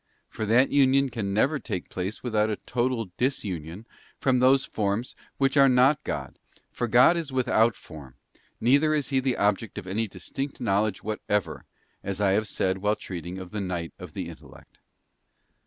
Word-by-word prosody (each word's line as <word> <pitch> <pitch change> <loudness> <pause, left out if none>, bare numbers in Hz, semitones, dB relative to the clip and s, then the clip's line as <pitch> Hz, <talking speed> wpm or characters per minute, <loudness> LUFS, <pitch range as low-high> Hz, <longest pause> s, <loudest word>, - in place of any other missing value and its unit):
For 110 - -4
that 120 +5 +4
union 135 -1 +4
can 110 -5 -3
never 135 +9 +2
take 95 -10 -5
place 95 +3 -4
without 110 -3 +1
a, 105 - 0
total 120 -3 -2
disunion 100 - -3 0.3
from 130 -2 +2
these 130 +2 +4
forms 105 +3 -2 0.2
which 135 +1 +1
are 135 -1 +7
not 130 +4 +4
God, - - -5 0.3
for 120 - -2
God 125 +9 +6
is 165 -5 -3
without 120 -4 +2
form; 70 -6 -12 0.4
neither 145 +6 +3
is 145 -3 -1
He 135 -2 +2
the 130 -1 0
object 105 +1 0
of - - -5
any 105 +4 -2
distinct 135 +9 -6
knowledge 105 -2 0
whatever, 105 -1 -2 0.4
as 100 0 -3
I 100 -2 +3
have 105 +2 +1
said 95 0 -1
while 105 +2 +1
treating 90 -4 -7
of 95 -1 -8
the 105 -1 -3
Night 85 -4 -4
of - - -10
the - - -4
Intellect. - - -14
110 Hz, 170 wpm, -26 LUFS, 100-130 Hz, 0.4 s, are